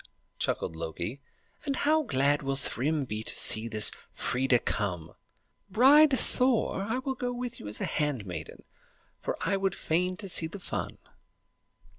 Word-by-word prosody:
chuckled 80 - -2
Loki; 85 - -5 0.4
"and 280 -2 -1
how 310 +4 +2
glad 140 - +1
will 135 -1 -2
Thrym 140 +2 -1
be 105 -3 -3
to - - -2
see 110 +1 +4
this 110 -2 +4 0.2
Freia 130 0 +1
come! 90 -8 -3 0.6
Bride 275 +7 +6
Thor, 250 -7 +1
I 225 +5 -2
will 265 +1 -2
go 245 -1 -3
with 245 -1 -5
you 105 - -8
as 105 - -5
your - - -1
handmaiden, 100 - -3 0.6
for - - -3
I 195 - 0
would 195 -1 -1
fain 180 +3 -1
see 185 -5 +2
the 165 - -8
fun." 185 - -5
155 Hz, 150 wpm, -28 LUFS, -, 0.6 s, Bride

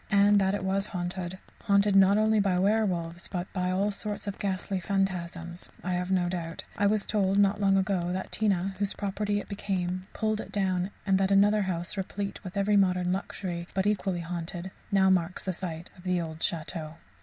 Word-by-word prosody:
And 200 0 +5
that 190 +1 +2
it 205 - -3
was 195 +1 0
haunted 180 0 -4 0.3
haunted 200 -1 +4
not 195 +1 +6
only 215 0 +3
by 195 -3 +2
werwolves 180 -4 +1
but 180 -1 -5
by 180 -1 0
all 195 +3 +1
sorts 210 +1 -4
of 200 -1 -5
ghastly 190 -1 -2
phantasms 180 -3 -2
I 185 - -2
have 180 +1 -1
no 185 -2 +2
doubt. 170 -2 -4
I 205 - +2
was 210 0 +2
told, 195 -2 +1
not 205 0 +3
long 195 -1 +4
ago, 185 -2 0
that 185 +1 -3
Tina, 195 -3 +1
whose 200 -1 0
property 205 +1 -1
it - - -8
became, 185 -2 -2
pulled 215 -1 0
it - - -10
down, 185 -2 0 0.2
and 195 -1 +3
that 190 0 +2
another 205 +2 +5
house, 180 -1 -2
replete 195 +1 -4
with 190 +1 -7
every 205 +1 +3
modern 180 -2 +3
luxury 180 -3 -4
but 190 0 +1
equally 195 -4 0
haunted[91:2] 170 +2 -5 0.2
now 190 -1 +5
marks 180 -1 +1
the 185 - -2
site 170 -1 -5
of 180 - -16
the 180 -1 +1
old 160 -1 -5
château. 160 -1 -3
190 Hz, 195 wpm, -28 LUFS, 180-200 Hz, 0.3 s, not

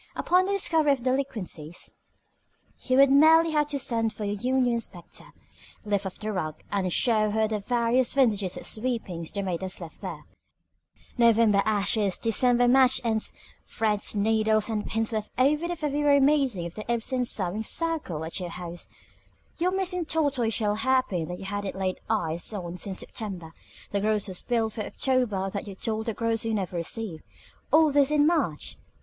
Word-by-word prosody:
Upon 365 +2 +2
the 400 - -1
discovery 320 -6 +3
of - - -1
her 245 - -14
delinquencies 220 - -3 0.9
you 255 0 +2
would 275 0 +6
merely 320 +3 +6
have 300 -1 +2
to 290 -1 -2
send 230 -4 -1
for 210 0 -5
the 200 - -1
union 250 +3 +1
inspector, 205 -7 -6 0.6
lift 205 -2 0
up 185 - -7
the 215 0 -4
rug 155 -5 -3 0.2
and 190 -3 0
show 215 +1 +2
her 220 +1 +1
the 215 -1 -2
various 235 +3 +1
vintages 210 -9 +1
of - - -7
sweepings 215 -8 -2
the 200 - -4
maid 180 -2 -3
has 185 -1 -4
left 170 -3 -10
there: - - -7 0.9
November 225 -3 +5
ashes; 205 -2 +1
December 245 +2 +3
match 260 +1 +5
ends; 220 -2 0 0.4
threads, 215 -1 -1
needles, 215 +1 +2
and 210 -1 -2
pins 225 +1 -1
left 215 -1 -3
over 275 +4 +4
from 340 - -3
the 350 - -2
February 295 -2 +2
meeting 270 - +2
of 170 - -6
the 215 +4 -5
Ibsen 250 +2 0
Sewing 205 -3 -1
Circle 260 - -1
at 165 - -3
your 180 -1 -4
house; 175 0 -8 0.7
your 355 +2 +2
missing 365 -2 -2
tortoise 280 -9 0
shell 210 -2 +1
hair 260 +4 +2
pin 170 -4 -3
that 180 - -5
you 195 - -9
hadn't 205 0 -4
laid 190 -1 -2
eyes 170 -6 -1
on 175 -4 -5
since 190 +1 -4
September; 180 -7 -6 0.4
the 200 - 0
grocer's 210 -3 -1
bill 225 -2 0
for 215 - -5
October 215 -5 -1
that 200 +1 -5
you 195 - -7
told 220 +2 -3
the 225 - -2
grocer 225 0 -1
you 225 - -1
never 190 -3 -3
received 170 0 -3 0.5
all 315 -1 +5
this 280 -1 +4
in 300 -1 +3
March. 295 - -1
220 Hz, 180 wpm, -26 LUFS, 195-260 Hz, 0.9 s, would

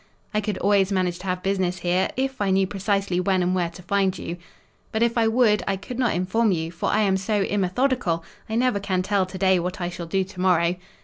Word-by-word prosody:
"I 210 - +1
could 205 -2 -2
always 200 -1 +2
manage 180 -2 0
to 190 - -8
have 180 0 -2
business 190 -2 0
here, 180 +1 +1
if 265 -2 -2
I 200 - +1
knew 190 0 +3
precisely 195 -1 -1
when 185 0 +1
and 180 +1 +1
where 175 -2 0
to 170 +1 -13
find 190 0 +1
you." 170 - -5 0.5
"But 220 +1 +1
if 235 0 +1
I 230 -1 +3
would, 220 -3 +3
I 195 - +1
could 235 +6 -7
not 245 -8 +2
inform 195 +5 +1
you, 165 -2 -2
for 170 - -2
I 215 - +2
am 195 -2 +2
so 200 +1 0
immethodical, 195 -2 0 0.3
I 220 - -2
never 245 -3 +2
can 185 -2 -1
tell 195 -1 +1
to 185 +1 -8
day 190 -1 +3
what 180 +2 -4
I 175 -1 -2
shall 175 -1 -7
do 190 +3 +1
to 185 -1 -8
morrow." 175 -2 +3
190 Hz, 240 wpm, -24 LUFS, 180-205 Hz, 0.5 s, knew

